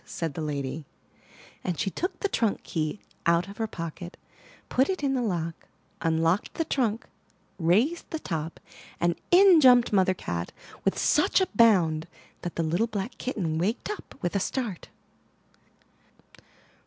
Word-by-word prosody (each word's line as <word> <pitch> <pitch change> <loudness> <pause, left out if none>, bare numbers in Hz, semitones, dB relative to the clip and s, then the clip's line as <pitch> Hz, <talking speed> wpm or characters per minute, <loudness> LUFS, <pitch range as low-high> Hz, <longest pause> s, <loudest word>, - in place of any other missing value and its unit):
*' - - -33
said 165 -3 -2
the 160 - -5
lady; 145 0 -3 0.8
and 180 -3 -2
she 195 - 0
took 365 - -3
the 405 - +2
trunk 225 - 0
key 160 +3 -2 0.3
out 170 +2 +3
of 200 - -10
her 225 - 0
pocket, 170 -1 -7 0.5
put 265 +6 +2
it 375 -5 -2
in 275 -1 +2
the 255 - 0
lock, 170 -7 -3 0.3
unlocked 165 +4 +1
the 325 - -1
trunk, 235 -6 0 0.5
raised 215 - +2
the 320 - -3
top 165 - -4 0.2
— - - -20
and 175 0 +2 0.2
in 360 -2 +7
jumped 245 -4 +6
Mother 185 -1 +3
Cat 85 - -4 0.3
with - - +1
such - - +3
a 375 - +2
bound 175 -8 +4 0.3
that 175 - -5
the 165 - 0
little 175 +8 +1
black 210 +1 -5
kitten 170 -11 -2
waked 215 - -1
up 420 - -8
with 175 +2 -1
a - - +3
start. 210 -2 -3
190 Hz, 160 wpm, -27 LUFS, 165-245 Hz, 0.8 s, in